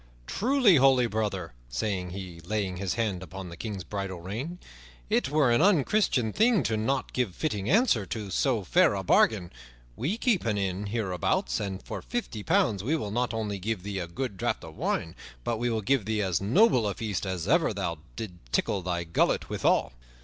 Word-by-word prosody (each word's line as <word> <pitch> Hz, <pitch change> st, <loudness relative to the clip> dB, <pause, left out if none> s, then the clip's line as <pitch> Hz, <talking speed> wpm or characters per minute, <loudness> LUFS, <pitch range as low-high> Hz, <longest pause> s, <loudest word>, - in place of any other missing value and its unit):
"Truly, 240 Hz, -, +4 dB
holy 135 Hz, -2 st, +5 dB
brother," 105 Hz, -, -2 dB, 0.2 s
said 90 Hz, -, -2 dB
he, 90 Hz, -2 st, -7 dB
laying 95 Hz, +1 st, -2 dB
his 95 Hz, -1 st, -2 dB
hand 105 Hz, -6 st, -1 dB
upon 95 Hz, +1 st, -8 dB
the 85 Hz, -, -8 dB
King's 100 Hz, -1 st, -5 dB
bridle 95 Hz, 0 st, -4 dB
rein, 115 Hz, -, -5 dB, 0.5 s
"it -, -, +2 dB
were 145 Hz, -4 st, +3 dB
an 120 Hz, -, +4 dB
unchristian 175 Hz, -, +3 dB
thing 220 Hz, -, +4 dB
to 115 Hz, -, 0 dB
not 130 Hz, +5 st, -1 dB
give 120 Hz, -8 st, -1 dB
fitting 105 Hz, -10 st, -2 dB
answer 220 Hz, -, +4 dB
to 105 Hz, -4 st, -5 dB
so 115 Hz, +1 st, +1 dB
fair 170 Hz, -, +4 dB
a 95 Hz, -, -3 dB
bargain. 90 Hz, -2 st, +3 dB, 0.4 s
We 170 Hz, -, -1 dB
keep 230 Hz, -6 st, +1 dB
an 110 Hz, -3 st, 0 dB
inn 95 Hz, +1 st, -2 dB
hereabouts, 95 Hz, -, 0 dB
and 95 Hz, -1 st, -4 dB
for -, -, -6 dB
fifty 230 Hz, -, -4 dB
pounds 100 Hz, -1 st, +2 dB
we 145 Hz, +8 st, +1 dB
will 105 Hz, -9 st, -4 dB
not 120 Hz, +3 st, 0 dB
only 105 Hz, -3 st, -3 dB
give 105 Hz, -1 st, -3 dB
thee 100 Hz, -1 st, -3 dB
a 85 Hz, -, -4 dB
good 100 Hz, +4 st, -4 dB
draught -, -, -1 dB
of -, -, -10 dB
wine, 80 Hz, -, -1 dB, 0.3 s
but 115 Hz, -2 st, -1 dB
will 115 Hz, -2 st, 0 dB
give 120 Hz, +2 st, +1 dB
thee 110 Hz, -1 st, 0 dB
as 95 Hz, -2 st, 0 dB
noble 125 Hz, -, +4 dB
a 100 Hz, -, -2 dB
feast 105 Hz, -3 st, -3 dB
as 90 Hz, -3 st, -3 dB
ever -, -, +3 dB
thou 85 Hz, -2 st, -3 dB, 0.2 s
didst 110 Hz, -5 st, -5 dB, 0.2 s
tickle 100 Hz, -, +1 dB
thy 90 Hz, -1 st, -2 dB
gullet 85 Hz, 0 st, +1 dB
withal." -, -, +2 dB
105 Hz, 190 wpm, -28 LUFS, 95-125 Hz, 0.5 s, holy